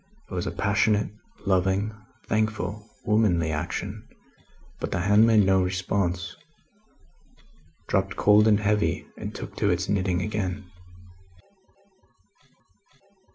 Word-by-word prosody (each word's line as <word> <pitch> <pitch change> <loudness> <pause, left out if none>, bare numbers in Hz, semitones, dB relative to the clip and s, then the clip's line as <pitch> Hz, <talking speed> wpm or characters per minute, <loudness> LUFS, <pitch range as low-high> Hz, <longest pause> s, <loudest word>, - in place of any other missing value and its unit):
It - - -6
was 90 0 -2
a - - -2
passionate, 105 +2 +1 0.3
loving, 95 +2 +1 0.3
thankful, 110 0 -2 0.2
womanly 95 -7 +2
action, 80 +3 -4 0.7
but - - -4
the 85 - -1
hand 105 +4 +5
made 110 -3 +5
no 95 0 +4
response 90 -1 -1 1.5
dropped 95 -1 0
cold 105 +1 +5
and 105 -1 +4
heavy, 105 0 0
and - - -7
took - - -7
to 100 - +1
its 90 0 0
knitting 95 -2 0
again. 100 -2 -3
100 Hz, 110 wpm, -26 LUFS, 90-105 Hz, 1.5 s, hand